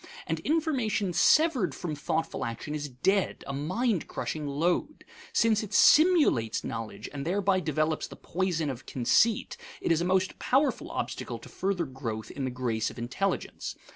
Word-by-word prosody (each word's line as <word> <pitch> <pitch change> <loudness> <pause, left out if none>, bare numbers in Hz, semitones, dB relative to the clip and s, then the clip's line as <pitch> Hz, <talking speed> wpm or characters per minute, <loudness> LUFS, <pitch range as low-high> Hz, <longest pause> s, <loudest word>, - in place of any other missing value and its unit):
And - - -2
information 260 - 0
severed 260 - +4
from 170 -4 -4
thoughtful 155 +2 -2
action 115 +6 -4
is 150 -1 -3
dead, 190 +10 0
a 140 - -5
mind 185 - -1
crushing 150 -2 -4
load. 170 - -1 0.3
Since 220 -2 +3
it 210 -1 -5
simulates 300 - +5
knowledge 110 -2 -5
and 140 -1 -4
thereby 190 +3 +1
develops 155 -1 -1
the - - -11
poison 170 -5 -1
of 130 0 -9
conceit, 200 - +2 0.2
it - - -1
is 165 0 +3
a - - 0
most 185 0 +1
powerful 265 -2 +1
obstacle - - -4
to - - -13
further 185 -3 -1
growth 115 -5 -5
in 135 - -4
the - - -1
grace 120 -3 -1
of - - -12
intelligence. 125 +12 -3
165 Hz, 160 wpm, -28 LUFS, 135-210 Hz, 0.3 s, simulates